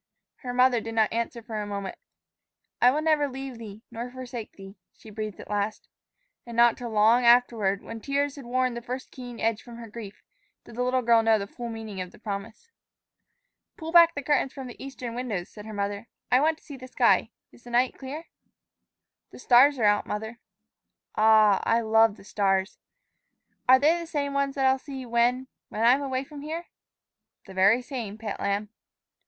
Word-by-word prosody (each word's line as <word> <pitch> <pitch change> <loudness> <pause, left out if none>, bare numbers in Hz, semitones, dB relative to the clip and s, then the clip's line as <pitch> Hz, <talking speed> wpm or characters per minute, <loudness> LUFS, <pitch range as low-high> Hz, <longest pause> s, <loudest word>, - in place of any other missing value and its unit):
Her 250 - -6
mother 250 -1 +3
did 225 0 -6
not 220 -1 +2
answer 235 0 -3
for 220 -2 -4
a 205 - -5
moment. 200 -2 -5 0.9
"'I 245 - +7
will 295 +4 0
never 305 -2 +2
leave 265 -2 -7
thee, 215 -1 -10
nor 235 +1 -5
forsake 250 -3 -8
thee,'" 195 0 -12 0.2
she 220 - -14
breathed 215 -1 -6
at - - -10
last. 205 +1 -3 0.6
And 235 -1 -9
not 235 -1 +6
till 245 -2 -6
long 220 +3 +4
afterward, 235 -5 +3
when 230 -1 -8
tears 280 +1 -1
had 280 -4 -10
worn 255 +1 0
the 235 - -6
first 250 +2 -6
keen 245 -3 -9
edge 225 -1 0
from 235 -1 -12
her 235 -1 -9
grief, 210 -2 -10 0.4
did - - -13
the 245 - -2
little 255 0 +1
girl 230 -1 +5
know 225 -1 +4
the 200 - -4
full 235 +4 -7
meaning 220 -4 -6
of 180 - -6
the - - -17
promise. 215 - -7 1.1
"Pull 325 0 -6
back 335 -1 +7
the 285 - -4
curtains 280 -2 +1
from 270 - -7
the 245 - -10
eastern 255 -3 -7
windows," 230 -8 -4
said 210 0 -11
her - - -7
mother; 200 +1 -3 0.2
"I 250 - +6
want 315 +2 +2
to - - -26
see 285 - -10
the 255 0 -10
sky. - - +3 0.2
Is 240 - -20
the - - -10
night 245 +2 +2
clear?" 285 +5 -7 1.0
"The - - -13
stars 260 +3 +5
are 235 - -2
out, 205 0 +3
mother." 220 +3 -5 0.8
"Ah, 215 -2 +5
I 230 +1 +2
love 220 -1 +3
the - - -15
stars!" 195 -1 0 0.9
"Are 260 - +9
they 310 +6 +3
the 335 - -7
same 285 -3 -2
ones 280 -1 0
that 270 -1 +1
I'll 265 0 +3
see 265 -2 -8
when 240 +2 +1 0.2
when 220 - -3
I'm 250 +4 +5
away 265 -1 -2
from 285 +1 -11
here?" 320 +4 -5 0.8
"The 195 - -11
very 200 +6 +4
same, 235 -6 -6
pet 220 -2 -5
lamb." 200 +1 -1
235 Hz, 200 wpm, -26 LUFS, 215-260 Hz, 1.1 s, Are